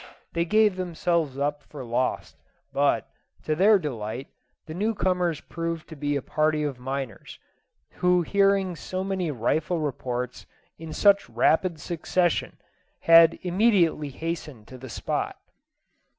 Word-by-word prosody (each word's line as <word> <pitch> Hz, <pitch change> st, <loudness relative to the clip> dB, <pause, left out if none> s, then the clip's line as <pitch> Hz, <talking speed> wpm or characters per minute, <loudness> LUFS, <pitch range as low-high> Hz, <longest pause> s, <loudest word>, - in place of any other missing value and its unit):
They 170 Hz, 0 st, 0 dB
gave 215 Hz, +1 st, +3 dB
themselves 170 Hz, -5 st, -1 dB
up 145 Hz, +1 st, -1 dB
for 140 Hz, -4 st, -10 dB
lost, 120 Hz, +2 st, -2 dB, 0.4 s
but, -, -, +2 dB, 0.4 s
to 155 Hz, -, 0 dB
their 205 Hz, +5 st, +6 dB
delight, 125 Hz, -, -5 dB, 0.4 s
the 155 Hz, -, -7 dB
new 215 Hz, +6 st, -1 dB
comers 180 Hz, -5 st, 0 dB
proved 165 Hz, -1 st, -5 dB
to 160 Hz, -, -8 dB
be 145 Hz, 0 st, -1 dB
a 140 Hz, -, -2 dB
party 155 Hz, 0 st, +1 dB
of 140 Hz, -4 st, -3 dB
miners, 130 Hz, -3 st, -5 dB, 0.6 s
who 180 Hz, -1 st, +4 dB
hearing 195 Hz, -1 st, +2 dB
so 185 Hz, +3 st, -4 dB
many 190 Hz, -3 st, -2 dB
rifle 150 Hz, +6 st, 0 dB
reports 125 Hz, -4 st, -4 dB, 0.3 s
in 165 Hz, -1 st, -8 dB
such 200 Hz, -, +3 dB
rapid 160 Hz, +8 st, +2 dB
succession, 175 Hz, +1 st, -1 dB, 0.4 s
had 165 Hz, 0 st, +7 dB
immediately 180 Hz, -5 st, +2 dB
hastened 150 Hz, -6 st, -6 dB
to 130 Hz, -, -10 dB
the 130 Hz, 0 st, -9 dB
spot. -, -, -3 dB
160 Hz, 135 wpm, -26 LUFS, 140-180 Hz, 0.6 s, had